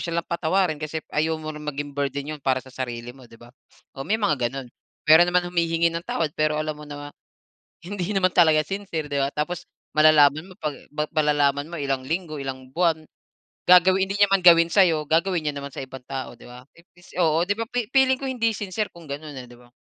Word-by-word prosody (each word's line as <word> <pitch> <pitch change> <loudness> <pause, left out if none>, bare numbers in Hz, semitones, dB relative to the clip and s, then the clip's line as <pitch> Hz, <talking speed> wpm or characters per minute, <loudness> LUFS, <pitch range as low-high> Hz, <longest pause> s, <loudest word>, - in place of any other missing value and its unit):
silang 170 -1 -2
patawarin 170 -1 0
kasi 155 0 -5
ayaw 160 +1 +1
mo 155 0 -6
na 150 - -9
maging 145 -1 -5
burden 140 0 -2
'yun 150 - -8
para 130 -1 +1
sa 130 - -15
sarili 120 -2 -5
mo 130 -2 -16
'di 115 - -16
ba. 120 +1 -17 0.4
O 135 - -10
may 200 +11 0
mga 150 - 0
gano'n, 135 +2 -7 0.4
meron 160 +3 +7
naman 180 0 +2
humihingi 170 -1 +1
ng 165 - -3
tawad 155 -3 -1
pero 155 0 0
alam 155 0 -2
mo 150 0 -12
na, 145 0 -8 0.7
hindi 195 +1 -4
naman 185 -1 +3
talaga 160 -3 +5
sincere, 170 -4 -4
'di 140 - +1
ba 135 - +1
tapos, 155 +3 -3 0.3
malalaman 155 +1 +5
mo - - -15
'pag 150 -2 -2 0.4
malalaman 145 -1 +1
mo - - -4
ilang 135 -2 -1
linggo, 160 +2 -3
ilang 130 -1 -7
buwan, 165 -1 +1 0.6
gagawin 185 +2 +6
hindi 195 - -2
niya 205 -1 +5
man 195 - +4
gawin 170 -1 +7
sa'yo, 170 -6 +4
gagawin 170 +1 +1
niya 145 - -3
naman 140 - -6
sa 135 - -5
ibang 130 -1 -11
tao 135 -1 -5
'di - - -15
ba. 125 +1 -12
Imbes 175 +1 -20
oo 165 0 +3
'di 205 - +1
ba. - - 0
Fi-feeling 260 +2 +2
ko - - -5
hindi 230 -3 0
sincere 205 +1 -3
kung 170 -1 -14
gano'n 145 +1 -6
eh 130 - -7
'di 120 - -14
ba. 120 0 -21
155 Hz, 215 wpm, -24 LUFS, 140-175 Hz, 0.7 s, meron